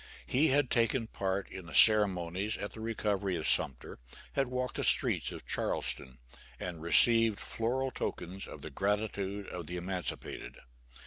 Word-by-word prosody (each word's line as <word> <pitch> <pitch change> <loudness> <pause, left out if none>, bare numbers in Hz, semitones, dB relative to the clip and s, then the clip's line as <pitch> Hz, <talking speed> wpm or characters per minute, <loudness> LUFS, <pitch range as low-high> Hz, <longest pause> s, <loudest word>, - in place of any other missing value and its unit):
He 145 +5 +3
had 140 -1 +2
taken 115 0 +2
part 95 -2 -2
in 90 -3 -8
the 80 - -7
ceremonies 100 0 +5
at 100 - -5
the - - -10
recovery 105 -4 -1
of 80 - -2
Sumter, - - +1 0.3
had 135 -1 +1
walked 125 0 -3
the - - -1
streets - - +1
of - - -9
Charleston, 65 -1 -2 0.4
and 85 -3 -5
received 115 +5 +4
floral 130 +4 -2
tokens 95 -4 -5
of - - -10
the - - -7
gratitude 100 -1 -1
of 85 -4 -6
the 90 - -4
emancipated. 90 0 -5
100 Hz, 150 wpm, -32 LUFS, 90-115 Hz, 0.4 s, ceremonies